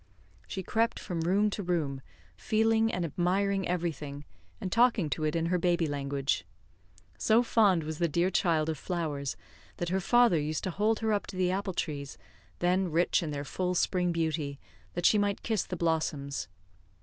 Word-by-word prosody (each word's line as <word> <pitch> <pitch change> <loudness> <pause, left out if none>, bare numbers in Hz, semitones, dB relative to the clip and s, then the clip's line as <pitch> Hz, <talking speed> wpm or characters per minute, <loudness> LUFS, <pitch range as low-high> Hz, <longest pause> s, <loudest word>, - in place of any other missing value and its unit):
She 190 - -4
crept 230 +5 +1
from 175 -4 -4
room 200 +5 +2
to 205 - -3
room, 160 -7 -1 0.3
feeling 220 - +2
and 180 -1 -1
admiring 190 +4 0
everything, 150 -5 -3 0.3
and 185 - -4
talking 230 - +3
to 155 - -2
it 155 - 0
in 165 0 +1
her 180 +1 +1
baby 175 -1 +2
language. 140 -1 -1 0.8
So 225 +2 +4
fond 200 -8 +3
was 155 0 -5
the 170 - +3
dear 170 +4 +1
child 165 -4 +2
of 160 -3 -2
flowers, 150 -6 -3 0.4
that 175 - -2
her 190 +2 +1
father 240 -3 +4
used 150 +1 -2
to 185 - -2
hold 215 +5 +1
her 220 -1 +1
up 205 - -1
to - - -8
the 180 -1 +1
apple 195 0 -2
trees, 140 -5 -4 0.4
then 180 +1 +1
rich 170 +4 +2
in 165 - -3
their 145 -1 -4
full 180 +5 -2
spring 180 0 +1
beauty, 155 -4 -2 0.4
that 175 0 -2
she 210 - +6
might 205 -1 0
kiss 220 -4 0
the 180 - -5
blossoms. 160 -4 -1
175 Hz, 180 wpm, -30 LUFS, 155-195 Hz, 0.8 s, she